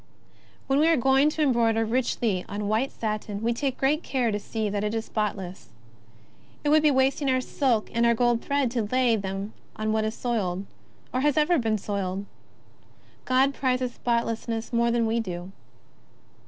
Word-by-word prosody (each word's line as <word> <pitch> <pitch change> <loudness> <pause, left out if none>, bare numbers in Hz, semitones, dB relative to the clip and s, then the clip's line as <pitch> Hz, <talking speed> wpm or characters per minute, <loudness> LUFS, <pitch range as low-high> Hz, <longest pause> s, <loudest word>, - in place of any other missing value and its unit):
When 270 +1 +2
we 310 - +4
are 330 -1 +4
going 270 +3 +4
to 305 0 -1
embroider 230 -4 +2
richly 225 -5 0
on 205 0 -3
white 220 +6 0
satin, 215 -1 -4
we 235 +1 +2
take 265 +2 -2 0.2
care 250 -7 0
to 205 - -1
see 220 +1 -3
that 205 0 -2
it 210 +1 -1
is 225 0 -2
spotless. 195 -4 -4 0.9
It 295 - +1
would 310 +1 +5
be 305 - +4
wasting 270 +1 +2
our 255 0 +3
silk 255 -4 0
and 235 - +1
our 235 0 +4
gold 240 0 +2
thread 280 -4 0
to 240 -2 0
lay 240 +2 +2
them 195 0 -4 0.2
on 215 0 -1
what 220 0 +1
is 220 +1 -2
soiled, 200 -6 -2 0.5
or 255 - 0
ever 300 +3 +3
has 320 - +3
been 220 -1 +1
soiled. 195 -1 -3 1.0
God 265 +2 +3
prizes 255 -2 -1
spotlessness 230 -1 -2
more 235 0 +3
than 235 -1 +2
we 225 +1 +1
do. 180 -3 -5
235 Hz, 175 wpm, -26 LUFS, 215-260 Hz, 1.0 s, would